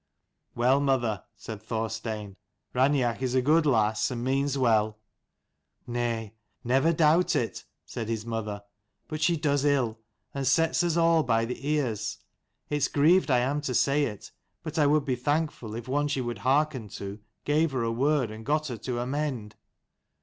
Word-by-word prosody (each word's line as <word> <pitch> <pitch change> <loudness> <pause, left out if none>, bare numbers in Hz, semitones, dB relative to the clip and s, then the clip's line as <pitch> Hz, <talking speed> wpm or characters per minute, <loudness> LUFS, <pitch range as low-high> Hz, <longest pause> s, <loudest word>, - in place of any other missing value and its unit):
" - - -53
Well, 125 +3 +3
mother," 120 -8 0
said 105 0 -8
Thorstein, 110 -2 -4 0.2
' - - -51
Raineach 130 -2 +2
is 130 -1 -1
a 130 - +4
good 155 +3 +4
lass, 110 -5 +2
and 120 -2 -4
means 135 +2 0
well." 110 -4 +2 0.5
" - - -53
Nay, 120 -3 -2 0.3
never 135 +6 +3
doubt 165 +2 +3
it," 120 -6 -2 0.2
said 115 -2 -5
his 110 -1 -2
mother. 110 -3 -4 0.2
" 105 - -50
But 155 -1 -4
she 170 +1 +3
does 145 -2 +1
ill, 130 -6 +1 0.3
and 140 -1 -2
sets 165 +5 +3
us 170 -1 +1
all 165 -1 +4
by 115 -4 +1
the 125 +4 -5
ears. 115 -7 -1 0.5
It's 150 -2 +1
grieved 160 +5 +3
I 125 -2 +4
am 140 +4 0
to 130 -4 -3
say 140 +3 +3
it, 105 -6 -7 0.3
but 160 0 -3
I 145 - +5
would 150 -1 +3
be 130 -3 0
thankful 145 -4 -2
if 115 +1 -7
one 145 +3 +1
she 145 -2 -1
would 120 -4 -3
hearken 135 -1 +1
to 100 +1 -6 0.3
gave 155 +2 +2
her 130 -3 -1
a 115 - 0
word 135 0 +1
and 110 +1 -9
got 150 +3 0
her 120 - -4
to 120 +3 -4
amend." 130 -5 -3
130 Hz, 180 wpm, -27 LUFS, 115-145 Hz, 0.5 s, I